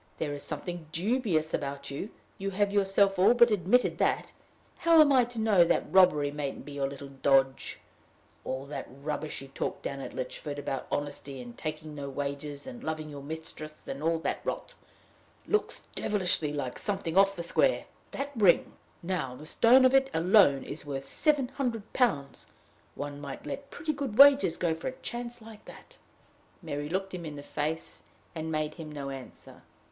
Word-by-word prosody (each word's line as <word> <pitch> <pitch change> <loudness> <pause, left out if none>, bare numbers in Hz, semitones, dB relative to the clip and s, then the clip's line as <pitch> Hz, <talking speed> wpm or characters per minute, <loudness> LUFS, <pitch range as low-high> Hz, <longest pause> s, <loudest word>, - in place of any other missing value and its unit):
There 150 -2 -2
is 145 - -6
something 175 -3 -5
dubious 180 -5 0
about 140 -1 -3
you 145 +9 -4 0.3
you 195 +1 -2
have 200 +1 0
yourself 195 -1 +3
all 195 +6 +6
but 235 -1 +6
admitted 210 +5 +2
that: - - +1 0.4
how 335 -1 +5
am 300 -2 +7
I 255 -2 +5
to 240 0 -10
know 210 -5 +5
that 170 - 0
robbery 150 -7 +5
mayn't 145 -1 -5
be 145 - -9
your 140 -1 -1
little 140 0 -9
dodge? 135 -1 +1 0.6
All 130 +1 -4
that 145 - -6
rubbish 150 +1 -5
you 135 - -12
talked - - -4
down 140 - -4
at - - -7
Lychford 145 +3 -5
about 135 -2 -4
honesty, 145 -2 -4
and 120 -1 -9
taking 155 0 -5
no 140 -1 -5
wages, 140 +1 -5
and 255 -2 -9
loving 155 -1 -3
your 140 -1 -8
mistress, 155 +1 -8
and 135 - -5
all 165 +1 +2
that 165 - -2
rot, - - -4 0.7
looks 425 - 0
devilish 190 -5 +2
like 145 -4 -3
something 190 -5 -2
off 195 0 +5
the 170 - -4
square! - - +2 0.2
That 280 +1 -4
ring, 200 -6 +4 0.3
now, 165 -8 -2
the 150 - -11
stone 250 +10 +5
of 255 - +5
it 270 0 +4
alone, 165 -5 +5
is 150 - -6
worth 135 -2 -5
seven 285 - +1
hundred 245 -6 -3
pounds: 145 - 0 0.5
one 145 0 -6
might 140 -2 -7
let 280 0 -6
pretty 320 -3 -3
good 275 -6 -4
wages 275 - +7
go 170 -2 +1
for 160 - -6
a 260 0 -5
chance 240 -1 -5
like 220 -1 -13
that!" - - -14 0.6
Mary 145 -2 -4
looked 190 +2 -2
him 180 -2 -5
in 155 -2 -6
the 145 - -8
face, 155 +3 -3 0.3
and 160 -1 -4
made 155 -1 -1
him 160 -2 -8
no 140 -2 -5
answer. 135 -2 -10
160 Hz, 180 wpm, -29 LUFS, 145-210 Hz, 0.7 s, am